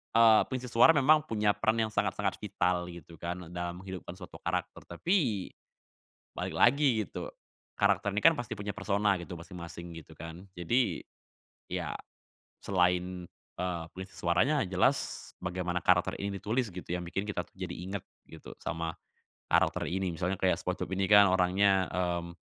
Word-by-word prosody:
eee, 115 -1 +7
pengisi 130 -1 -4
suara 120 +7 +7
memang 150 +2 +5
punya 105 -2 +2
peran 110 +1 +1
yang 110 - 0
sangat-sangat 100 -1 0
vital, 90 -4 0
gitu 85 -1 -12
kan, 85 0 -5
dalam 90 +1 -4
menghidupkan 95 -2 -7
suatu - - -10
karakter. - - -2 0.2
Tapi, 135 - +1 0.8
balik - - -4
lagi 125 -4 +4
gitu, - - -6 0.5
karakter 100 - +2
ini - - +2
kan 165 - +9
pasti 120 -3 -4
punya 105 +1 -4
persona 100 0 +1
gitu, 85 +1 -7
masing-masing, 85 0 -9
gitu 80 0 -16
kan. 85 +4 -9
Jadi, 120 +9 0 0.7
ya, - - -3 0.7
selain, 90 -1 +1 0.3
eee, 90 -2 -2
pengisi 95 +1 -8
suaranya, 125 - +2
jelas, 95 0 0
bagaimana 90 -1 -2
karakter 90 0 +3
ini 100 0 -3
ditulis 115 +4 -1
gitu 90 -1 -9
yang 90 - -2
bikin 95 +3 -2
kita 105 -4 -2
tuh - - -17
jadi 90 -2 -4
inget, 95 +2 -5 0.2
gitu, 80 - -10
sama 80 0 -3 0.6
karakter - - +2
ini. 95 0 -1
Misalnya 90 +3 -1
kayak 95 0 +1
SpongeBob - - -3
ini 95 0 0
kan, 105 0 +8
orangnya, 95 +1 +3
mmm, 85 -1 -2
95 Hz, 155 wpm, -30 LUFS, 90-105 Hz, 0.8 s, kan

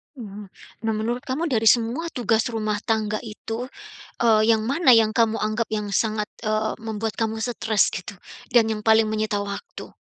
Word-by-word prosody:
Mmm, 210 -4 -9 0.4
nah 220 - +1
menurut 235 +3 -2
kamu 275 +6 -2
dari 225 -2 +2
semua 245 +8 +1
tugas 225 -4 0
rumah 215 -2 -2
tangga 215 -2 -1
itu, 225 +2 -6 0.5
eee, 220 -1 +4
yang 220 - +2
mana 275 +1 +3
yang 220 -2 +4
kamu 225 -1 +2
anggap 215 +2 -1
yang 210 -1 -1
sangat, 215 -2 0 0.2
eee, 215 0 0
membuat 220 -1 -3
kamu 225 -1 -1
stres 220 -3 +1
gitu, 185 +2 -6 0.4
dan 235 -2 +5
yang 215 -1 -2
paling 220 0 +5
menyita 215 -1 -1
waktu? 200 0 -7
220 Hz, 170 wpm, -23 LUFS, 215-230 Hz, 0.5 s, dan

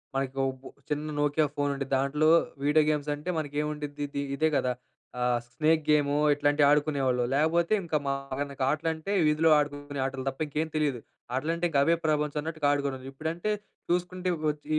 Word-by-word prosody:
మనకు 135 0 -2
ఒబ్ 130 0 -9 0.3
చిన్న 150 +1 -2
'Nokia 145 +1 +2
phone' 145 0 0
ఉండిద్ది. 135 -1 -5
దాంట్లో 140 +3 +1 0.4
వీడియో 150 +2 +4
గేమ్స్ 150 -1 -1
అంటే 150 +5 -7
మనకేముండ్డిద్ది 150 -1 -3
ఇది. 140 0 -4
ఇదే 155 +2 +2
గదా, 125 - +1 0.5
ఆహ్, 125 -1 +2
స్నేక్ 155 0 +2
గేము, 145 -1 +3 0.2
ఇట్లాంటివి 145 0 +3
ఆడుకునేవాళ్ళు 140 -4 +2
లేకపోతే, 170 +5 +2
ఇంక 165 - -12
మనకు 140 0 -3
ఆటలు 155 +2 0
అంటే, 160 +5 -6 0.2
వీధిలో 155 +1 +3
ఆడుకునే 145 -1 -3
ఆటలు 135 0 -4
తప్ప 135 - -9
ఇంకేం 155 +2 -2
తెలీదు. 145 -5 0 0.4
ఆటలంటే, 165 +5 -1
ఇంక 145 - 0
అవే 165 +2 +4
ప్రపంచం 150 -1 0
అన్నట్టుగా 155 -1 -2
ఆడుకోవాడం. 140 -2 -1
ఇప్పుడంటే 160 +8 -3 0.4
చూసుకుంటే, 180 +1 -1
ఇప్ 155 - -5
వచ్చి 150 0 -14
145 Hz, 160 wpm, -28 LUFS, 140-155 Hz, 0.5 s, వీడియో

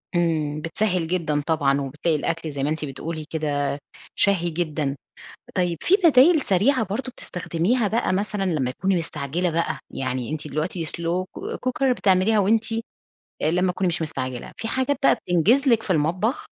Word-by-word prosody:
إمم، 155 -3 0
بتسهِّل 180 +1 0
جدًا 160 -4 0
طبعًا، 140 -4 +2
وبتلاقي 150 +4 -1
الأكل 165 +1 -2
زي 140 -1 -3
ما 145 - +1
أنتِ 155 0 -2
بتقولي 155 +3 -5
كده 145 -3 -1 0.4
شهي 180 -4 +2
جدًا، 155 -4 -2 0.6
طيب 175 -3 +1
في 370 - +4
بدايل 310 +1 +6
سريعة 225 +6 +2
برضه 230 +7 -4
بتستخدميها 195 +5 -1
بقى 220 -2 0
مثلًا 200 +1 -1
لما 150 -9 0
تكوني 190 +7 0
مستعجلة 165 +2 -2
بقى، 170 +1 -1
يعني 130 -2 -3
أنتِ 155 -1 -4
دلوقتي 160 +4 -2
slow 170 +3 -2
co - - -4
cooker 260 +1 +2
بتعمليها 195 +3 +3
وأنتِ 220 +3 +3 0.8
أ 155 - +3
لمَّا 180 +2 +2
تكوني 185 +1 0
مش 165 -1 -1
مستعجلة، 130 -5 -4
في 225 - -4
حاجات 260 +3 0
بقى - - +6
بتنجِز 200 - +2
لِك 230 -2 +4
في 190 - 0
المطبخ؟ 180 - 0
170 Hz, 165 wpm, -23 LUFS, 155-205 Hz, 0.8 s, بدايل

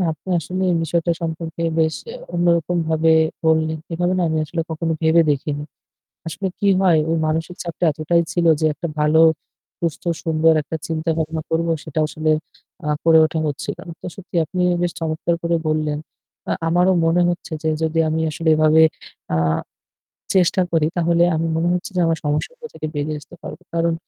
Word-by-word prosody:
না, - - +2
আপনি 155 +4 -14
আসলে 185 +4 -4
এই - - +2
বিষয়টা 170 +1 0
সম্পর্কে 165 0 -4 0.2
বেশ 160 0 +2 0.4
অন্যরকম 175 0 +2
ভাবে 160 0 +2 0.4
বললেন। 160 0 +2
এভাবে 175 +2 0
না - - +2
আমি 160 0 0
আসলে 165 +2 -3
কখনো 160 +1 -1
ভেবে 160 +1 +5
দেখিনি। 145 +1 -2 0.7
আসলে 190 +4 -3
কি 205 - +1
হয় 175 -5 +4
ওই 165 - +1
মানসিক 160 +3 -2
চাপটা 170 0 -2
এতটাই 155 +3 +1
ছিল 175 -1 0
যে 160 - +1
একটা 170 - -5
ভালো, 150 +2 +4 0.6
সুস্থ, 170 -3 -3 0.2
সুন্দর 160 0 +3
একটা 160 +2 -5
চিন্তা 160 0 -2
ভাবনা 160 0 -2
করব 165 +1 0 0.2
সেটা 155 0 -4
আসলে 155 0 -1 0.5
অ্যাঁ 150 0 -1
করে 165 -1 +6
ওঠা 160 +1 -2
হচ্ছিল 145 +2 -4
না। - - -6
তো - - -9
সত্যি 190 -2 -11
আপনি 180 +4 -3 0.2
বেশ 175 -1 0
চমৎকার 160 +1 -1
করে 170 0 +1
বললেন। 155 -1 0 0.5
অ্যাঁ - - -1
আমারও 180 +3 +3
মনে 165 +2 +3
হচ্ছে 175 0 -4
যে 160 - +1
যদি 160 +1 0
আমি 160 +1 -1
আসলে 160 +2 -1
এভাবে 155 +1 +5 0.5
অ্যাঁ 80 -1 +1 0.8
চেষ্টা 185 0 +3
করি 160 -2 +2
তাহলে 170 0 +3
আমি 165 +1 0
মনে 165 +1 +1
হচ্ছে 180 +3 -3
যে 180 - +2
আমার 165 0 +1
সমস্যাটা 460 - -2
থেকে 155 - -5
বেরিয়ে 150 +1 -2
আসতে 145 - -15
পারবো। - - -8
কারণ 170 0 +1
165 Hz, 180 wpm, -20 LUFS, 155-170 Hz, 0.8 s, করে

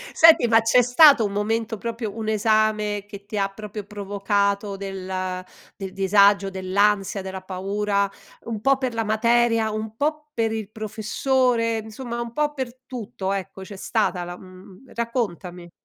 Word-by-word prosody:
Senti, 325 -6 +7
ma 225 0 +5
c'è 225 +3 +4
stato 250 0 +6
un 200 - -3
momento, 225 +2 -1
proprio 225 0 -5
un 220 -1 -3
esame, 215 -1 +1
che 200 -1 -11
ti 210 +1 -5
ha 195 0 +1
proprio 210 +1 -8
provocato 200 0 -1
del 185 -1 -4 0.3
del 195 -2 -6
disagio, 200 +1 +4
dell'ansia, 195 +1 +1
della 190 0 -6
paura? 200 +2 -1 0.4
Un 225 -3 -4
po' 270 +3 +3
per 260 -2 -2
la 225 0 -1
materia? 230 +1 +2
Un 215 0 -5
po' 300 +1 -2
per 225 -1 0
il 220 -3 -4
professore? 230 +2 0
Insomma, 235 +2 -6
un 235 -1 -5
po' 295 +3 0
per 260 -3 -5
tutto, 215 -6 -4
ecco, 195 0 -5
c'è 200 +1 -9
stata 190 -2 -1
la 175 0 -7
mhmm, 185 +4 -15
raccontami. 185 -7 -3
210 Hz, 155 wpm, -23 LUFS, 195-230 Hz, 0.4 s, Senti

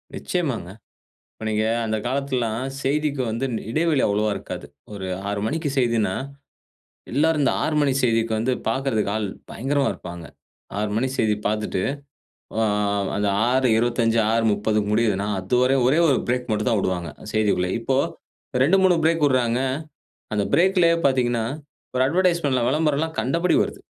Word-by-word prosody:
நிச்சயமாங்க. 140 - -2 0.6
இப்ப - - -12
நீங்க 110 0 0 0.2
அந்த 110 0 -1
காலத்ல்லாம் 130 -3 -1 0.2
செய்திக்கு 145 0 0
வந்து 115 +4 -2 0.3
இடைவெளி 155 0 +2
அவ்வளவா 105 +1 +1
இருக்காது. - - -7 0.3
ஒரு 95 -2 -5 0.2
6 100 0 -2
மணிக்கு 155 +3 -2
செய்தின்னா 115 -6 +1 1.0
எல்லோருந்த 150 -1 +2
6 155 - 0
மணி 140 -2 +2
செய்திக்கு 115 -2 +2
வந்து 120 +4 0 0.2
பாக்குறதுக்கு 115 -4 0
ஆள் 110 -2 -1 0.2
பயங்கரமா 135 +3 0
இருப்பாங்க. 85 -1 -9 0.5
6 105 0 -1
மணி 130 +4 +1
செய்தி 110 -1 +2
பார்த்துட்டு, 105 -3 -1 0.8
ஆ - - +3 0.5
அந்த 105 0 0 0.2
6:25 120 -2 +2
6:30க்கு 105 -2 +1
முடியுதுன்னா, 105 -3 +1
அதுவர 125 +7 +2
ஒரே 140 +6 +3
1 140 - +3
பிரேக் 125 0 -1
மட்டும் 105 +3 0
தான் 110 -3 +2
விடுவாங்க, 90 -3 -2 0.2
செய்திக்குள்ள. 105 -4 +1
இப்ப 115 +3 -1 0.7
2,3 190 +4 +4
பிரேக் 165 -1 +2
விட்றாங்க. 125 -3 +2 0.7
அந்த 105 -1 +1
பிரேக்‌லயே 180 -2 +4
பாத்தீங்கன்னா, 120 -4 +1 0.5
ஒரு 130 - +3
அட்வர்டைஸ்மென்ட்லாம், 165 -7 +2
விளம்பரம்லாம் 155 +2 0
கண்டபடி 165 +10 +1
வருது. - - -6
120 Hz, 130 wpm, -23 LUFS, 110-145 Hz, 1.0 s, 2,3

